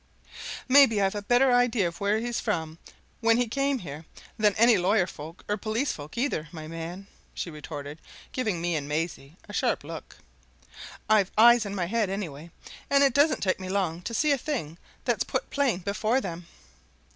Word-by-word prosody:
"Maybe 260 -5 +6
I've 195 -1 +2
a 205 - -3
better 245 +5 +4
idea 245 -6 +3
of 170 - -7
where 205 +2 +2
he 225 - -3
was 240 -1 -2
from, 165 -6 -3 0.4
when 230 0 +4
he 245 0 +1
came 275 +3 0
here, 155 - -8 0.3
than 210 -3 +2
any 230 +1 +6
lawyer 190 +1 +3
folk 165 0 -10
or 210 - 0
police 225 +6 -1
folk 150 +8 -9
either, 235 - -1
my 155 -2 -8
man!" 165 +4 -7 0.3
she 170 - -4
retorted, 150 -1 -8 0.3
giving 215 -9 -1
me 175 0 -1
and 145 -2 -3
Maisie 155 0 -4
a 205 - -10
sharp 240 - 0
look. 160 +1 -9 0.9
"I've 210 -3 +4
eyes 235 -1 +7
in 200 - -5
my 180 -3 -1
head, 215 +2 0
anyway, 170 -5 -5 0.4
and 280 0 +5
it 275 -3 +4
doesn't 290 +3 +3
take 185 -1 +1
me 185 -1 -6
long 185 -4 -1
to 230 - -5
see 305 +3 +2
a 280 - +2
thing 175 - -4 0.3
that's - - +1
put - - -3
plain 265 -10 +1
before 215 +6 0
them." 175 -5 -6
200 Hz, 190 wpm, -27 LUFS, 165-235 Hz, 0.9 s, eyes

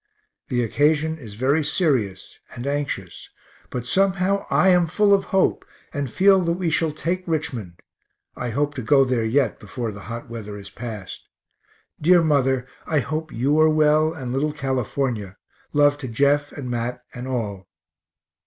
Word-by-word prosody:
The 120 -3 0
occasion 155 +6 +1
is 110 -7 -10
very 140 +7 +2
serious, 125 - -1 0.2
and 120 - -6
anxious, 140 -10 -3 0.4
but 125 -1 -4
somehow 195 +6 +1
I 190 - +4
am 180 -2 +4
full 205 +5 +3
of 195 - +3
hope, 190 - +1 0.3
and 140 -2 -2
feel 195 - +5
that 170 -1 +1
we 175 -2 -1
shall 160 0 +1
take 170 +5 -2
Richmond 125 - -3 0.6
(I 125 - -4
hope 145 +5 0
to 130 - -5
go 135 +4 +4
there 125 -3 0
yet 120 +1 +1
before 115 +2 -5
the 100 - -10
hot 115 +1 -6
weather 110 -3 -7
is 100 -1 -10
past). 110 -5 -8 0.7
Dear 175 +2 +5
mother, 135 -4 +2 0.2
I 155 -3 +2
hope 155 +3 -4
you 140 +6 +1
are 155 0 +6
well, 155 0 +3
and 130 -7 -5
little 150 +3 0
California 130 -6 -2 0.3
love 145 0 +3
to 135 - -5
Jeff 140 +4 +2
and 135 -3 -7
Mat 120 0 -3
and 125 +1 -6
all. 105 -7 -3
140 Hz, 160 wpm, -23 LUFS, 120-155 Hz, 0.7 s, are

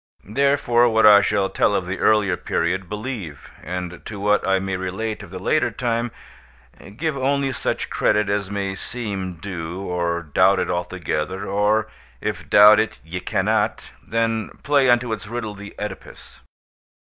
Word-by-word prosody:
Therefore, 120 0 +3
what 110 -1 +3
I 105 -1 +9
shall 100 -1 +1
tell 105 - +2
of 95 - -1
the 95 +1 -4
earlier 105 -4 +3
period, 90 +2 -2
believe; 105 - -6
and 90 -1 -6
to 105 -2 -7
what 105 +1 +2
I 95 0 +3
may 95 0 -2
relate 95 +5 -4
of 100 - -11
the 95 - -7
later 155 +12 +1
time, 120 -1 -1 0.9
give 160 0 -1
only 135 0 0
such - - -3
credit 105 0 +2
as 100 -1 -1
may 100 -1 -2
seem 95 -4 -5
due, 85 0 -6
or 85 -3 -2
doubt 95 +5 +3
it - - -1
altogether, 90 +1 -3
or, 105 +2 +1 0.3
if - - -4
doubt 105 +1 +8
it 110 0 -1
ye 90 +2 -5
cannot, - - -1
then 115 -1 -1
play 140 -3 +3
unto 120 -1 +3
its 105 -1 -6
riddle 115 -2 -4
the 100 0 -10
Oedipus. - - -8
100 Hz, 160 wpm, -22 LUFS, 95-115 Hz, 0.9 s, I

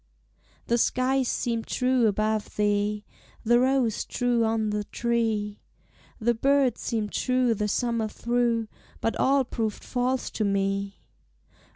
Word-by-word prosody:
The 235 0 +1
skies 255 +2 +1
seemed 230 -2 -2
true 250 -2 +2
above 215 +1 -1
thee, 210 0 0 0.4
The 240 +2 +4
rose 255 -3 +1
true 245 -1 0
on 220 -1 0
the 210 0 -1
tree; 225 -3 -1 0.6
The 240 +1 +2
bird 270 +2 +2
seemed 215 -3 -2
true 255 -2 +1
the 210 -1 -1
summer 230 +1 0
through, 235 0 0 0.3
But 225 - -1
all 275 0 +3
proved 220 -3 -3
false 255 +1 -1
to 220 - -2
me. 195 0 -1
230 Hz, 130 wpm, -26 LUFS, 210-245 Hz, 0.6 s, The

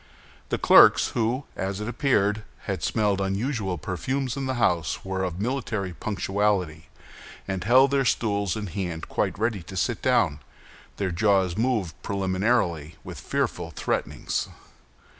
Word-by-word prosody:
The - - 0
clerks, - - +7
who, 120 +4 -1
as 95 +1 -3
it 105 - -4
appeared, 110 -5 +1 0.2
had - - -3
smelled 105 -3 +1
unusual 100 -1 -1
perfumes 130 - -2
in 135 -1 -3
the 130 - -1
house, 90 -10 0
were 95 0 -2
of 90 -1 -3
military 110 -5 -2
punctuality, 95 -4 -1 0.6
and 95 -2 -3
held 130 +6 +5
their 140 -1 +2
stools 100 -6 0
in 105 -1 -4
hand 90 -3 -4
quite - - -1
ready 110 -2 -1
to 95 +3 -9
sit - - -1
down. 75 - +2 0.6
Their 95 -2 -1
jaws 95 -1 +2
moved 110 -7 -1
preliminarily 95 -5 0
with - - -8
fearful - - -2
threatenings. - - -2
100 Hz, 140 wpm, -25 LUFS, 95-115 Hz, 0.6 s, clerks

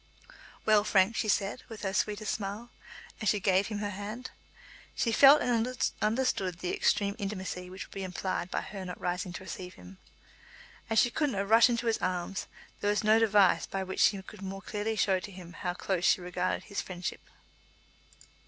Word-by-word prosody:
"Well, 215 -1 +5
Frank?" 200 +1 +3
she 215 - -1
said, 200 +3 0
with 220 -2 -9
her 195 -1 -1
sweetest 210 +1 0
smile, 210 +3 -5 0.5
as 215 - +2
she 210 - +2
gave 190 0 +2
him 215 - -4
her 205 0 -3
hand. 210 +6 -6 0.6
She 230 - +1
felt 275 +5 +7
and 245 +1 0 0.2
understood 215 -6 0
the 180 +1 -3
extreme 200 -1 +1
intimacy 185 -3 -4
which 185 +1 -7
would - - -16
be 195 - -5
implied 185 -1 -3
by - - -1
her 195 -2 -7
not 180 -1 -7
rising 180 +1 -2
to 180 - -7
receive 180 -1 -7
him. 90 +1 -14 0.9
As 225 - 0
she 240 - +5
could 295 +3 +1
not 200 -5 -2
rush 225 +3 +7
into 235 0 -1
his 225 -1 +1
arms 185 +1 -2 0.3
there 205 - 0
was 210 0 +1
no 215 +1 +5
device 205 -4 +4
by 195 0 -3
which 190 0 -5
she 200 - +4
could 205 +1 -12
more 195 0 -6
clearly 215 +1 -2
show 195 -3 +2
to 205 +2 -8
him 180 -2 -11
how 180 -1 -3
close 180 -1 -2
she - - +4
regarded 180 0 -2
his 200 - -4
friendship. 180 -2 -5
200 Hz, 190 wpm, -30 LUFS, 185-215 Hz, 0.9 s, felt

